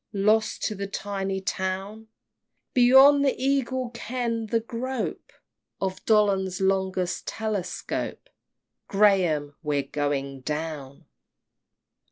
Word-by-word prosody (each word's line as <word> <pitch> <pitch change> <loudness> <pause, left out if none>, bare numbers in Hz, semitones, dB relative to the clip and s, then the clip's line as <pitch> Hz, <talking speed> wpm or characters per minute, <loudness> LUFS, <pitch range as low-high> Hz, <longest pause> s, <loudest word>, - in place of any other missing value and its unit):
Lost 215 +2 +2
to 215 - 0
the 200 -1 -4
tiny 195 -1 -3
town! 195 +3 -3 0.7
Beyond 265 +3 +7
the 275 - +2
Eagle's 260 -2 0
ken 235 -1 -3
the 230 +2 +1
grope 240 +2 -4 0.5
Of 190 -1 -3
Dollond's 195 -4 +2
longest 190 -2 0
telescope! 215 - -3 0.6
Graham! 180 -8 +3
we're 145 -3 0
going 140 -1 -2
down! 150 -2 -5
200 Hz, 95 wpm, -26 LUFS, 180-230 Hz, 0.7 s, Beyond